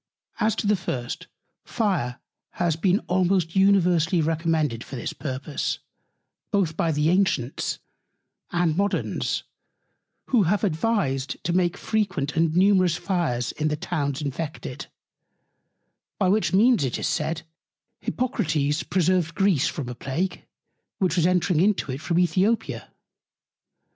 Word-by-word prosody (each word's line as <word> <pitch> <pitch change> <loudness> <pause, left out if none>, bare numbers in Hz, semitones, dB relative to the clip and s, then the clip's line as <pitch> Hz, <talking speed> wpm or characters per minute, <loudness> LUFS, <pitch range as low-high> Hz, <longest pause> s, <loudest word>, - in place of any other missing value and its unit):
As 215 0 +2
to - - -3
the 210 +1 +4
first; 160 -2 -4 0.4
Fire 180 - -1 0.3
has 170 -3 0
been 185 +5 +2
almost 180 -1 +1
universally 180 -3 +4
recommended 160 -6 0
for 135 - -9
this 120 - -4
Purpose, 140 +1 -3 0.7
both 190 -7 +1
by 165 0 +1
the 150 +1 +2
Ancients 180 -10 0 0.7
and 175 -3 +1
Moderns; 200 +3 -1 0.9
who 245 -4 +4
have 205 +2 +1
advised 160 -8 0
to 170 - -1
make 180 +1 +1
frequent 190 -10 -1
and 165 0 +2
numerous 185 -2 +4
Fires 165 - -1
in 155 - -2
the 150 0 -1
Towns 145 -3 -2
infected: 150 +2 -5 1.3
By 190 -3 +2
which 205 -3 +2
Means, 220 - +4
it 130 - -1
is - - -3
said, 160 0 -1 0.6
Hippocrates 155 - 0
preserved 180 -2 +1
Greece 190 -8 +3
from 145 -6 -4
a 125 - -4
Plague, 140 +9 -3 0.5
which 185 -2 +1
was 175 -1 +3
entring 180 -2 +2
into 195 -7 +1
it 130 +3 -5
from 170 +1 -1
Æthiopia. 185 +6 +1
170 Hz, 130 wpm, -25 LUFS, 150-190 Hz, 1.3 s, the